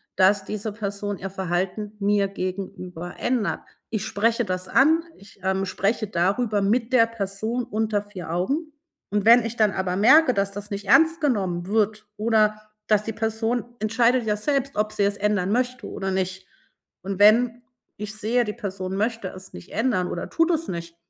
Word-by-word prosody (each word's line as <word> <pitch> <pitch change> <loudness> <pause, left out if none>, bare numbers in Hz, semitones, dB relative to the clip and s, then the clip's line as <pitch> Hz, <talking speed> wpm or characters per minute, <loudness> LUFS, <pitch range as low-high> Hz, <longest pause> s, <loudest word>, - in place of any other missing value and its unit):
dass 195 +1 +4
diese 215 0 -4
Person 205 -1 -4
ihr 195 - -5
Verhalten 190 +3 -2
mir 200 0 +2
gegenüber 185 -2 -6
ändert. 245 -5 -1 0.3
Ich 215 -4 -2
spreche 230 +3 +1
das 185 -1 -3
an 315 - +4
ich, 200 0 -17
ähm, 190 0 0
spreche 200 +3 -1
darüber 205 +3 +1
mit 230 +5 +1
der 230 -2 +6
Person 220 +2 -3
unter 220 -3 -1
4 185 -6 -8
Augen, 280 - -1 0.4
und 205 -1 +1
wenn 235 0 +7
ich 230 +1 -4
dann 215 -2 +4
aber 185 -1 -2
merke, 255 +7 +6
dass 200 0 0
das 205 +1 -8
nicht 200 0 -4
ernst 320 +6 +5
genommen 190 -10 0
wird 215 0 0
oder 215 -1 +2 0.3
dass 210 -1 +3
die 225 - -4
Person 225 +2 -1 0.2
entscheidet 230 +3 +2
ja 210 -1 +1
selbst, 275 +4 -1
ob 215 0 0
sie 210 -1 0
es 200 0 +1
ändern 205 -2 0
möchte 250 -1 -1
oder 190 0 -4
nicht. 190 0 -2 0.6
Und 195 +1 -4
wenn 235 +3 +5 0.3
ich 210 +1 -6
sehe, 235 +3 +1
die 210 - -3
Person 190 -4 -5
möchte 220 -2 -1
es 185 0 -11
nicht 85 - -11
ändern 215 -5 0
oder 175 - -5
tut 330 +1 +2
es 330 0 -1
nicht 170 -1 -6
210 Hz, 175 wpm, -24 LUFS, 195-230 Hz, 0.6 s, wenn